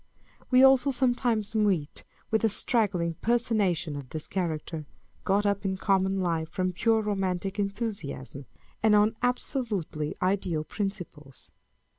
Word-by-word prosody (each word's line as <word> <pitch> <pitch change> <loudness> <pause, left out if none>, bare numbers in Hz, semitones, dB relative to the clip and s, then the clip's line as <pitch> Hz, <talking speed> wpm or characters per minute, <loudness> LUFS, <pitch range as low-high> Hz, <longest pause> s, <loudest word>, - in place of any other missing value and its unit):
We 255 0 +6
also 270 +1 +6
sometimes 245 -5 +1
meet 195 -9 0 0.3
with 220 0 +1
a 225 - +4
straggling 200 -6 +1
personation 210 -9 +1
of 140 -3 -7
this 155 -1 -5
character, 160 -4 -3 0.4
got 200 +2 +2
up 200 -1 0
in 190 -1 -1
common 190 0 +1
life 165 -3 -1
from 185 0 -1
pure 220 +4 +2
romantic 195 -1 -2
enthusiasm, 195 - -4 0.3
and 215 -1 +5
on 210 +2 +4
absolutely 220 - -1
ideal 180 -4 0
principles. 180 -8 -6
195 Hz, 125 wpm, -28 LUFS, 170-220 Hz, 0.4 s, We